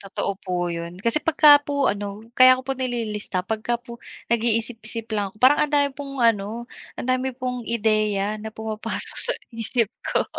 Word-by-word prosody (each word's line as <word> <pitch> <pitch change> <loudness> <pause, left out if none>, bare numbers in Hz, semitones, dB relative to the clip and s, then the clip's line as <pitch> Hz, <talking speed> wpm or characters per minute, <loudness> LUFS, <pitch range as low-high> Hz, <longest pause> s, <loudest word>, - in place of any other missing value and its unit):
totoo 195 0 -3
po 185 - -4 0.2
yun 170 +1 -6
kasi 235 +6 +1
pagka 295 -2 +6
po 285 -1 0
ano 205 +1 -6
kaya 255 0 +8
ko 260 - -7
po 270 - -1
nililista 225 -7 -3
pagka 220 +3 -1
po 235 -1 -12 0.3
nag-iisip-isip 230 0 -1
lang 205 -2 0
ako. - - -26
Parang 260 +3 +6
ang 300 - 0
dami 285 -1 +4
pong 275 0 -8
ano, 225 +1 +1 0.3
ang - - -5
dami 255 +1 +1
pong 250 -2 -4
ideya 215 -2 +1
na 220 - -5
pumapasok 220 0 -5
sa - - +2 0.2
isip 230 -1 -1 0.2
ko. - - +1
230 Hz, 175 wpm, -23 LUFS, 215-255 Hz, 0.3 s, kaya